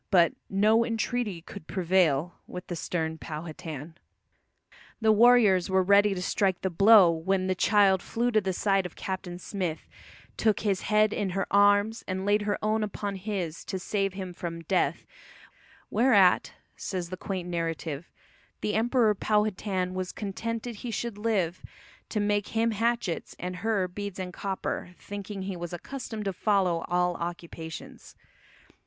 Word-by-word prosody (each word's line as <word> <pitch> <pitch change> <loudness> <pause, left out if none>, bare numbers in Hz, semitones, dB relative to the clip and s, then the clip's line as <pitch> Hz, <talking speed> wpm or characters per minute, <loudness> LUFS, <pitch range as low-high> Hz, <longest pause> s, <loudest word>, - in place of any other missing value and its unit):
But 170 -4 +5 0.2
"no 215 +4 +4
entreaty 225 -5 -2
could 155 - -10
prevail" 175 -4 +2
with 180 - -7
the 175 - -5
stern 160 -1 -3
Powhatan. 155 -1 -7 1.1
The 220 -1 +4
warriors 215 -5 +5
were 190 0 +3
ready 200 +1 +5
to 180 - -3
strike 190 -1 +1
the 190 - -1
blow, 195 0 +7
when 185 +3 0
the 185 - +1
child 195 -1 +4
flew 240 +2 -1
to 215 -2 +3
the 190 -1 -1
side 195 0 +1
of 175 - -18
Captain 185 -2 -5
Smith, 180 -4 -4 0.5
took 215 -2 +2
"his 200 -3 0
head 215 0 +3
in 205 -3 -1
her 195 - +1
arms 205 +2 +4
and 190 0 -3
laid 205 +1 +3
her 205 0 -1
own 215 +1 +1
upon 205 -1 -3
his 185 -4 -4
to 190 - -3
save 195 +1 -1
him 190 -2 -6
from 170 -1 -6
death, 180 +3 0 0.9
whereat," 205 -5 +4 0.2
says 180 -2 -4
the - - -2
quaint 185 -1 -4
narrative 165 -2 -3 0.5
"the 210 - -1
Emperor 225 0 +3
[Powhatan] 205 -3 0
was 185 -1 -3
contented 230 +3 -4
he 240 - -6
should 230 -1 -4
live 195 -6 0 0.5
to 215 - -1
make 205 0 +1
him 230 +1 +3
hatchets 225 -4 -1
and 180 +1 -5
her 205 -2 0
beads 200 +1 -6
and 185 -1 -5
copper," 190 -2 -4
thinking 200 -1 -6
he 190 -1 -4
was 175 0 -6
accustomed 220 +2 -6
to 195 - -1
follow 185 -4 +1
all 180 0 +1
occupations. 170 -2 -7
195 Hz, 155 wpm, -28 LUFS, 180-210 Hz, 1.1 s, blow